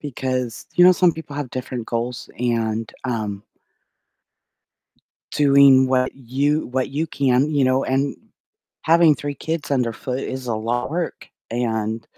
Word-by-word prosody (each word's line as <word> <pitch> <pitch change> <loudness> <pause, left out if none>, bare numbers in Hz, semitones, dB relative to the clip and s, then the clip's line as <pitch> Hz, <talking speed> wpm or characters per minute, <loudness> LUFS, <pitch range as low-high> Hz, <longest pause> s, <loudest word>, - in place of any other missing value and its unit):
because, 130 -4 -3
you 175 - +6
know, 180 - +8
some 180 -1 +3
people 160 -3 -9
have 145 -3 -4
different 125 -2 -5
goals 120 +1 -3
and, 115 -2 -1
um 110 -5 -3 1.9
doing 140 -2 +6
what 130 0 +1
you 140 +4 -1
what 130 +1 -2
you 150 +4 -1
can, 135 -1 +1
you 140 -2 +3
know, 130 +1 +2
and 135 +1 0 0.7
having 165 -1 +5
3 145 0 -5
kids 160 +1 -4
underfoot 125 -1 -1
is 130 -1 -5
a 115 - 0
lot 120 +4 -2
work, 170 +1 -4 0.2
and 115 -2 -2
130 Hz, 140 wpm, -21 LUFS, 120-145 Hz, 1.9 s, know